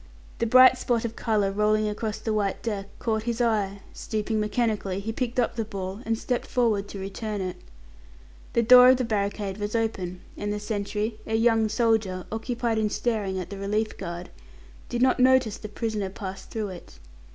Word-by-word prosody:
The 230 - +1
bright 255 +2 +7
spot 235 -2 0
of 230 0 -4
colour 210 -4 +1
rolling 210 +1 +2
across 210 0 -3
the 220 0 -2
white 205 -2 -1
deck 205 -4 -3
caught 220 -2 -1
his 235 0 -2
eye; 205 -4 0
stooping 215 0 -2
mechanically, 210 -3 0
he 215 +3 -3
picked 250 +1 -2
up 235 - +1
the 225 - -1
ball, 195 -1 -5
and 225 0 +1
stepped 245 +2 -2
forward 220 -5 +1
to 200 - -8
return 205 +2 -4
it. 185 -1 -4 1.0
The 235 - +3
door 250 +2 +9
of 260 - +6
the 255 - 0
barricade 205 -2 -2
was 205 +2 -3
open 190 -6 -2
and 205 0 -3
the 210 - -2
sentry 210 +1 -3
a 220 - 0
young 225 -1 +3
soldier, 215 -5 +1
occupied 230 0 -1
in 215 -1 +1
staring 205 -4 -1
at 180 +1 -6
the 200 - -6
relief 210 +2 -1
guard 175 -1 -6 0.6
did 240 0 0
not 260 0 +3
notice 255 -4 +4
the 210 - -7
prisoner 210 -2 -2
pass 195 0 -7
through 215 -3 -4
it. 180 -2 -11
215 Hz, 185 wpm, -26 LUFS, 200-230 Hz, 1.0 s, door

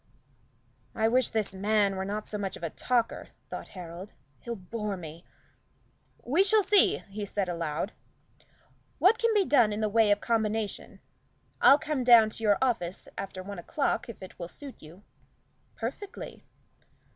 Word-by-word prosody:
"I 220 0 +2
wish 250 +1 +3
this 215 -3 -1
man 200 0 +1
were 190 0 -3
not 210 +2 -3
so 210 - -5
much 195 -2 -3
of - - -15
a 165 - -2
talker," 240 -2 -1 0.2
thought - - -6
Harold, 180 +3 -8 0.3
"he'll 235 -1 -5
bore 210 +1 -4
me. 165 0 -9 1.0
We 305 +10 +3
shall 425 +1 +4
see," 410 +1 +4
he 210 +1 -5
said 200 -1 -2
aloud, 170 +2 -2 1.1
"what 430 +5 +4
can 465 -1 +2
be 400 -2 +4
done 240 -9 +4
in 210 - -3
the 215 - +1
way 220 0 +4
of 205 0 +3
combination. 220 -2 -2 0.6
I'll 275 - +8
come 295 -3 -2
down 235 -3 +7
to 225 - -8
your 205 -2 +4
office 205 -9 -1
after 190 -1 -6
one 200 -1 -7
o'clock 275 - -1
if 225 - -9
it 185 - -12
will 170 - -5
suit 275 - -10
you?" 165 +6 -14 0.7
"Perfectly." 410 -1 -7
215 Hz, 160 wpm, -28 LUFS, 190-245 Hz, 1.1 s, I'll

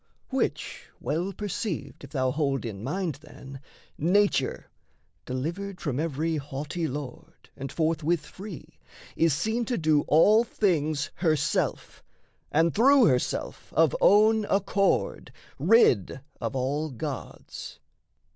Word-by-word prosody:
Which - - -2
well 170 +6 -2
perceived 190 - -4
if 140 - -9
thou 130 -3 0
hold 140 -3 -1
in 105 -3 -6
mind, 160 +1 -2
Then 135 -3 -11 0.4
Nature, 180 -4 +2 0.6
delivered 175 +9 -4
from 140 -4 -2
every 160 +1 -1
haughty 150 +4 -4
lord, 140 -2 -8
And 135 0 -6
forthwith 165 0 0
free, 190 -5 -10 0.4
is 165 0 +3
seen 220 +8 -1
to 245 - -1
do 155 -3 +3
all 210 +9 +6
things 155 -10 0
Herself 155 -5 -1 0.5
and 165 +2 +3
through 265 +3 +6
herself 125 -7 -1
of 160 -3 +4
own 215 +1 +5
accord, 195 0 0 0.3
Rid 145 - +4 0.2
of - - -3
all 140 +4 -1
gods. 125 -5 -7
155 Hz, 115 wpm, -27 LUFS, 140-195 Hz, 0.6 s, all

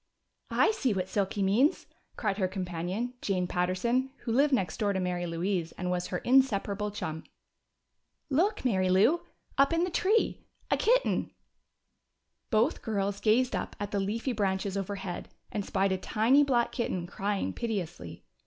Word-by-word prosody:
"I - - +4
see 270 - 0
what 185 -1 -1
Silky 200 0 0
means!" 225 +10 +3 0.3
cried 210 -2 -1
her 185 - +2
companion, 185 +5 -3
Jane 185 -3 0
Patterson 185 +9 0
who 235 - -3
lived 280 +5 +3
next 190 -11 0
door 205 -2 +1
to 190 - -1
Mary 180 -1 -1
Louise 170 0 -2
and 180 0 -3
was 180 0 -1
her 180 - -2
inseparable 210 -4 +2
chum. 160 -6 -5 1.0
"Look, 330 +5 +1
Mary 190 -6 +2
Lou! 220 - +4 0.4
Up 275 +2 +5
in 335 +1 +2
the 360 - -1
tree. 415 +6 +1 0.3
A - - +5
kitten!" - - +2 1.2
Both 225 +6 +2
girls 200 -2 -1
gazed 240 +4 +3
up - - -4
at 205 0 -4
the 200 - 0
leafy 220 +6 -1
branches 195 -2 -1
overhead 195 -2 -4 0.2
and 205 - -2
spied 195 0 0
a 190 - 0
tiny 235 +9 +3
black 245 -4 +2
kitten 185 -8 -2
crying 200 +2 -2
piteously. 175 - -4
200 Hz, 155 wpm, -29 LUFS, 185-245 Hz, 1.2 s, Up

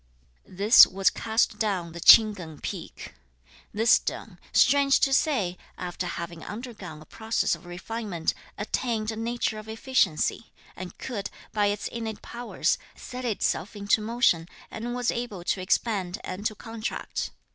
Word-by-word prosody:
This 200 +6 +8
was 195 +1 +2
cast 220 -1 0
down 190 -6 -1
the 170 - -8
Ch'ing 215 +5 +8
Keng 165 -6 -9
peak. - - -7 0.6
This 225 +3 +2
stone, - - +1
strange 280 -1 +5
to 270 - +3
say, 220 - +1 0.2
after 180 0 -4
having 170 -1 -6
undergone 205 -9 -8
a - - -21
process 220 +5 -1
of 180 - -7
refinement, 180 -1 -3 0.2
attained 220 +1 -1
a - - -6
nature 225 -1 -2
of 215 +1 -11
efficiency, 220 - 0 0.2
and 185 -1 -8
could, 220 -6 -5 0.2
by 210 -1 +2
its 205 0 -1
innate 225 -2 -5
powers, 240 0 -1 0.2
set 250 0 -7
itself 210 -3 -1
into 205 +1 +2
motion 210 -7 +1 0.2
and 240 +2 -4
was 245 -1 0
able 235 -7 -5
to 185 - -1
expand 190 -1 0
and 195 +4 -3
to 215 - -6
contract. 225 +1 -4
215 Hz, 145 wpm, -26 LUFS, 185-235 Hz, 0.6 s, This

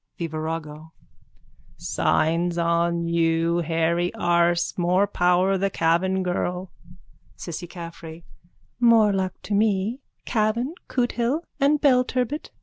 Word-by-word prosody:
_ - - -52
THE 170 - -3
VIRAGO: 155 0 -6 0.8
Signs 170 +2 0
on 170 0 +1
you, 165 0 +1
hairy 170 +1 0
arse. 170 0 +1
More 180 +2 +2
power 185 0 +2
the 195 +1 +1
Cavan 185 +2 +1
girl. 180 0 -3 0.6
CISSY 175 +1 -7
CAFFREY: 170 -1 -9 0.6
More 230 -4 +5
luck 185 -1 -1
to 210 - -4
me. 210 +3 +1 0.3
Cavan, 230 +5 0
Cootehill 245 +3 0 0.2
and 290 +2 +3
Belturbet. 255 0 +1
175 Hz, 110 wpm, -24 LUFS, 170-210 Hz, 0.8 s, More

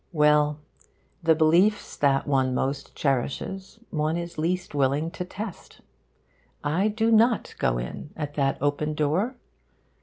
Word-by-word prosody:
Well, 150 -1 +3 0.6
the 165 -1 +4
beliefs 170 +7 +3
that 140 -1 +2
one 130 -3 +1
most 140 +2 -2
cherishes 140 - -2
one 155 0 0
is 170 -2 -6
least 175 +2 -1
willing 145 +3 +1
to 180 - -5
test. 195 +2 -8 0.8
I 165 +8 +1
do 220 +1 +1
not 230 +1 +3
go - - +1
in 65 - -6
at 145 -2 -4
that 135 -2 +1
open 145 +2 0
door. 165 - 0
155 Hz, 130 wpm, -26 LUFS, 145-180 Hz, 0.8 s, the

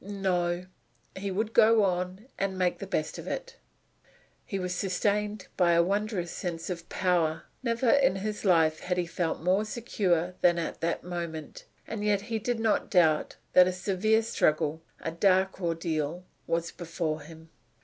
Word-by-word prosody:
No, 180 -3 -1 0.5
he 195 +1 -3
would 215 +4 -2
go 220 -1 +6
on, 185 +2 -1
and 195 -1 -1
make 180 -1 +1
the 195 - -6
best 155 -5 -2
of - - -8
it. - - -5 0.9
He 195 - -2
was 180 -1 -2
sustained 205 +2 -1
by 175 -2 +4
a 170 0 +5
wondrous 200 -2 -1
sense 170 0 -4
of 170 -1 -6
power. 175 -4 +1 0.2
Never 235 0 0
in 275 -9 +4
his 210 +2 -4
life 160 -5 +4
had 180 0 -2
he 180 - +1
felt 165 -1 -2
more 185 +4 +3
secure 190 -6 0
than 175 -1 +4
at 170 - -4
that 165 0 -1
moment, 170 -3 -6 0.2
and 220 -2 -5
yet 205 -1 +2
he 225 +1 -3
did 240 +2 -1
not 225 -1 +1
doubt 160 -5 +3 0.2
that 180 0 +8
a - - +1
severe 200 +4 +1
struggle 155 -6 +1 0.2
a 160 - -3
dark 190 +2 +2
ordeal 165 -1 -2 0.2
was 170 0 -1
before 165 -2 -3
him. 160 +1 -13
180 Hz, 165 wpm, -28 LUFS, 170-205 Hz, 0.9 s, that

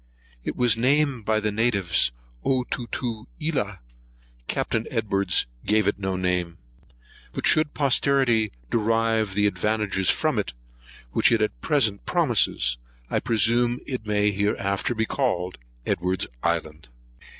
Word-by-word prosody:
It - - -4
was 120 -2 +4
named 135 -1 +1
by 110 -1 +2
the 105 0 0
natives 100 - +2 0.3
Otutuelah. 125 - -3 0.7
Capt. - - -1
Edwards 100 -5 +1 0.2
gave 105 -1 +2
no 95 -1 -2
name 90 -2 -1 0.2
to - - -30
it; - - -28 0.4
but - - -3
should 155 -1 +3
posterity 135 -5 +2 0.2
derive 115 -2 +1
the 105 0 +2
advantages 105 -2 0
from 155 -8 +2
it 100 - -3 0.6
which - - +3
it 115 - +3
at 105 - -2
present 110 -9 +1
promises, 115 - +2 0.3
I - - +2
presume 120 +2 +2
it 130 -5 -4
may 105 0 +2
hereafter 100 +2 -1
be 110 0 0
called 95 -10 -1 0.3
Edwards's 90 -3 -1
island. 80 -4 -2
110 Hz, 125 wpm, -24 LUFS, 95-120 Hz, 0.7 s, was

